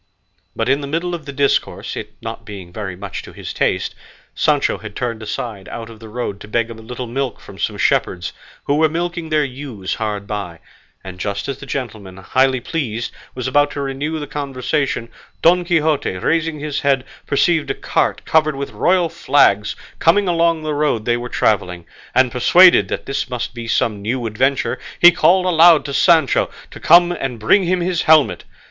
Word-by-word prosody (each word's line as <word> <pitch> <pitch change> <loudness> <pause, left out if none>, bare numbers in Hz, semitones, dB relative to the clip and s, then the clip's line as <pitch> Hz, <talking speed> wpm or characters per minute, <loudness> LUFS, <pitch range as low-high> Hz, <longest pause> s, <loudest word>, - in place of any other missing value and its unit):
But 115 - -1
in 135 +2 +2
the 140 - -5
middle 170 +4 -2
of 160 -4 -6
the - - -4
discourse, 140 0 0
it - - -7 0.3
being 100 -4 -9
not - - -21
very 100 -4 -5
much 100 +2 -6
to - - -12
his - - -7
taste, - - 0 0.4
Sancho - - +1
had - - -9
turned 115 -2 -3
aside 105 -2 -5
out 115 -1 -7
of 110 - -13
the 110 0 -11
road 105 -3 -4
to - - -11
beg 115 +1 -1
a - - -5
little 120 +3 -7
milk 130 +1 -3
from - - -13
some - - -2
shepherds, 90 -1 0 0.3
who 145 - 0
were 160 0 +4
milking 170 0 -3
their 155 -1 +2
ewes 125 -8 -6
hard 105 -2 -3
by; 100 -5 -5 0.5
and 95 -1 -9
just 100 +2 -3
as 140 -1 -4
the 135 - -10
gentleman, 110 -9 -5
highly 130 +7 +1
pleased, 120 -5 -3 0.2
was 130 0 -3
about 145 +2 +3
to 145 - -5
renew 140 +3 -3
the 150 - -4
conversation, 140 -3 -2 0.4
Don 175 +2 +5
Quixote, 160 - +1
raising 160 - 0
his 150 -1 -3
head, 135 -2 +2 0.2
perceived 155 +2 +2
a - - -1
cart - - -1
covered 155 -2 +2
with 140 0 -5
royal 180 -1 +2
flags 110 -10 +2 0.2
coming 195 +4 +3
along 170 -2 +2
the 155 -1 -2
road 145 -7 0
they 120 - +2
were 120 0 -5
travelling; 90 -7 0 0.3
and 130 -1 +4
persuaded 175 +9 +6
that - - -4
this 135 -1 -3
must 125 -1 -4
be 120 -1 -7
some 110 -2 0
new 120 +4 -2
adventure, 130 +4 0 0.2
he 175 - +9
called 185 +2 +3
aloud 170 -2 +6
to 140 - -4
Sancho 160 -1 +3 0.2
to - - -10
come 175 +1 +6
and 135 -8 -4
bring 185 - +3
him 180 +1 +1
his 175 -1 0
helmet. 155 -2 +4
135 Hz, 190 wpm, -19 LUFS, 115-160 Hz, 0.5 s, he